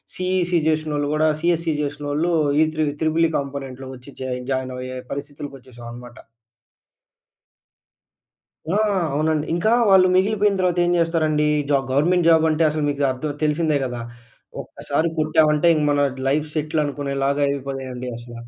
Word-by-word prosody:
CEC 180 -2 0
చేసినోళ్ళు 155 -2 -1
కూడా, 155 +1 +2
CSC 165 -1 +1
చేసినోళ్ళు 145 +3 -2 0.3
ఈ 160 - +5
three 155 0 +1 0.2
triple 160 +1 +2
ఈ - - -6
కాంపోనెంట్‌లో 135 -2 -6
వచ్చి 125 +2 -14
జా 130 -1 -3 0.2
జాయిన్ 130 -1 -2
అయ్యే 130 0 -6
పరిస్థితులకి 145 0 -6
వచ్చేసాం 120 -2 -13
అనమాట. 120 +1 -11 2.6
ఆ! - - +3 0.4
అవునండి. 155 +1 0
ఇంకా 215 +7 +2 0.2
వాళ్ళు 190 -1 +6
మిగిలిపోయిన 205 +1 +2
తర్వాత 180 -1 +1
ఏం 175 - +1
చేస్తారండి 160 -3 +1 0.2
జాబ్ 140 -2 +2
గవర్నమెంట్ 170 +6 +2
జాబ్ 160 -1 +5
అంటే 155 +1 +1
అసలు 155 0 -2
మీకు 145 0 -2
అర్థం 135 +4 -4
తెలిసిందే 155 0 +1
కదా. 125 -2 -5 0.6
ఒక్కసారి 150 +3 -2
కొట్టామంటే 155 +1 +3
ఇంక 155 -2 0
మన 145 0 +2 0.3
లైఫ్ 150 +3 +1
సెటిల్ 155 0 -1
అనుకునేలాగా 140 0 -2
అయిపోతాయండి 135 -2 -4
అసల. 120 0 -11
150 Hz, 140 wpm, -22 LUFS, 135-165 Hz, 2.6 s, వాళ్ళు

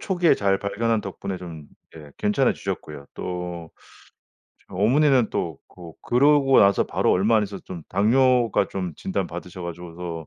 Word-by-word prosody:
초기에 180 -4 +2
잘 100 -1 +1
발견한 110 +3 -1
덕분에 95 -2 -6
좀 85 -4 -9 0.3
예 75 -3 -12
괜찮아지셨고요. 75 -7 -1
또 90 -2 -6 1.0
저 - - -12
어머니는 125 +4 +3
또 80 -4 -3
그 85 -2 -12
그러고 135 +1 +4
나서 100 0 +4
바로 - - 0
얼마 105 +5 +3
안 110 - +3
있어서 100 -1 -6
좀 85 -3 -8
당뇨가 120 +2 +2
좀 90 -3 -4
진단받으셔 90 -1 -5
가지고서 85 -1 -7
95 Hz, 315 characters per minute, -23 LUFS, 85-115 Hz, 1.0 s, 그러고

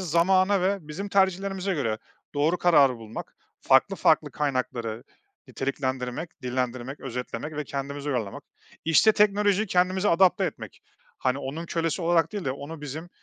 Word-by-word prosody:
zamana 185 +3 +3
ve 195 +1 +1
bizim 195 +7 -5
tercihlerimize 195 0 +1
göre 110 -7 -1 0.4
doğru 155 +5 +2
kararı 145 -8 +5
bulmak, 110 -1 -9 0.2
farklı - - +4
farklı - - +3
kaynakları 125 -5 -2 0.4
niteliklendirmek, 130 +2 -4
dillendirmek, 125 +1 -3
özetlemek 135 +4 -5
ve 150 - -2
kendimize 140 +1 -5
uyarlamak. 115 -7 -3 0.4
İşte, 165 +7 +5
teknolojiyi 205 0 +3
kendimize 185 +2 +2
adapte 180 +2 +4
etmek. - - -6 0.4
Hani, 130 +1 0
onun 155 +5 -5
kölesi 165 0 -1
olarak 165 -1 +2
değil 205 -3 -4
de 130 - 0
onu 145 +3 -8
bizim 150 +4 -6
155 Hz, 135 wpm, -26 LUFS, 130-185 Hz, 0.4 s, kararı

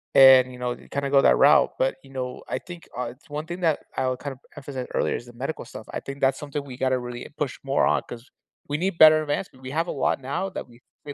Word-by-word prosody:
And, 130 -1 +8
you 125 - -11
know, 125 0 -1
you - - -17
kinda 140 0 -2
go 140 0 +5
that 60 - +5
route. - - +6
But, 130 - +1
you 135 - -16
know, 125 -1 -5
I - - -2
think, 175 -2 -11
uh, 125 - -1
it's 145 +3 -27
one 150 +1 -4
thing 175 +2 -6
that 160 -3 +2 0.2
I 130 - 0
would 130 - -3
kinda 140 -3 -6 0.2
emphasize 135 -2 -5
earlier - - +1
is - - -6
the 120 - -14
medical 135 +6 -4
stuff. 110 - -10
I - - -3
think 140 0 -8
that's 135 -1 +2
something 145 0 -4
we 130 -3 -9
gotta 130 -1 +1
really 125 0 -7
push 145 -3 -2
more 135 0 +2
on - - +2
'cause 120 +2 -9 0.4
we 145 - -1
need 180 +1 -1
better 155 -1 +8
advancement. 145 -2 -4
We 130 - -6
have 165 +4 0
a - - -2
lot 135 - 0
now 140 +9 -2
that - - -7
we 120 +1 -19 0.2
we 145 - -6
135 Hz, 270 wpm, -25 LUFS, 130-150 Hz, 0.4 s, And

